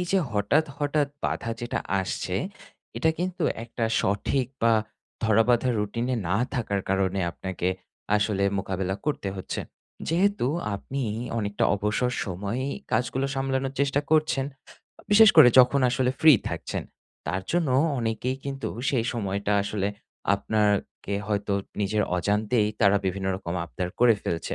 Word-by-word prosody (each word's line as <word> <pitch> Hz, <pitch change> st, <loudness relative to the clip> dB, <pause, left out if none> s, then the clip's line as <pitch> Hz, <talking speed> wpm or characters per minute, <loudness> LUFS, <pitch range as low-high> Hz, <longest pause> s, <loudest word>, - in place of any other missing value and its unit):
এই 180 Hz, -, 0 dB
যে 195 Hz, -, +5 dB
হঠাৎ, 105 Hz, +9 st, +2 dB
হঠাৎ 145 Hz, 0 st, +1 dB, 0.2 s
বাধা 115 Hz, -, -1 dB
যেটা 120 Hz, -, -2 dB, 0.2 s
আসছে 95 Hz, -1 st, -3 dB, 0.6 s
এটা 160 Hz, -, +3 dB
কিন্তু 180 Hz, -1 st, -2 dB, 0.2 s
একটা 115 Hz, 0 st, -3 dB, 0.2 s
সঠিক 105 Hz, +6 st, 0 dB, 0.2 s
বা 115 Hz, 0 st, +5 dB, 0.5 s
ধরাবাঁধা 115 Hz, +3 st, +3 dB
routine 110 Hz, +4 st, -2 dB
এ -, -, -1 dB
না 100 Hz, -, +2 dB, 0.2 s
থাকার 100 Hz, -5 st, -1 dB
কারণে 95 Hz, 0 st, +1 dB
আপনাকে 95 Hz, 0 st, -3 dB, 0.5 s
আসলে 100 Hz, -1 st, 0 dB, 0.2 s
মোকাবিলা 95 Hz, 0 st, -2 dB
করতে 145 Hz, -9 st, -1 dB
হচ্ছে। 95 Hz, -, -4 dB, 0.5 s
যেহেতু 195 Hz, -1 st, +2 dB, 0.3 s
আপনিই 120 Hz, +1 st, -3 dB, 0.2 s
অনেকটা 105 Hz, -2 st, -1 dB
অবসর 105 Hz, +5 st, 0 dB
সময়েই 105 Hz, +8 st, -3 dB, 0.2 s
কাজগুলো 130 Hz, +2 st, 0 dB
সামলানোর 135 Hz, 0 st, -1 dB
চেষ্টা 140 Hz, 0 st, +2 dB
করছেন, 155 Hz, -3 st, +2 dB, 0.7 s
বিশেষ 220 Hz, +1 st, +8 dB
করে 150 Hz, -6 st, +10 dB
যখন 130 Hz, +2 st, +6 dB
আসলে 125 Hz, 0 st, +1 dB
free 155 Hz, -6 st, +8 dB
থাকছেন -, -, -4 dB, 0.4 s
তার 95 Hz, +1 st, -1 dB
জন্য 170 Hz, -4 st, +1 dB, 0.3 s
অনেকেই 115 Hz, +3 st, -1 dB
কিন্তু 135 Hz, -1 st, -3 dB, 0.2 s
সেই 120 Hz, -5 st, +1 dB
সময়টা 100 Hz, -2 st, -2 dB
আসলে 100 Hz, -1 st, -1 dB, 0.5 s
আপনার 105 Hz, +1 st, +1 dB, 0.4 s
কে 100 Hz, -, -2 dB
হয়তো 105 Hz, -1 st, -1 dB, 0.3 s
নিজের 105 Hz, +1 st, +1 dB
অজান্তেই 105 Hz, +3 st, +1 dB
তারা 100 Hz, -1 st, +5 dB
বিভিন্ন 95 Hz, +1 st, -2 dB
রকম 85 Hz, -2 st, -5 dB
আবদার 90 Hz, +2 st, -4 dB
করে 120 Hz, -2 st, +6 dB
ফেলছে। 85 Hz, -1 st, -2 dB
115 Hz, 135 wpm, -26 LUFS, 100-135 Hz, 0.7 s, করে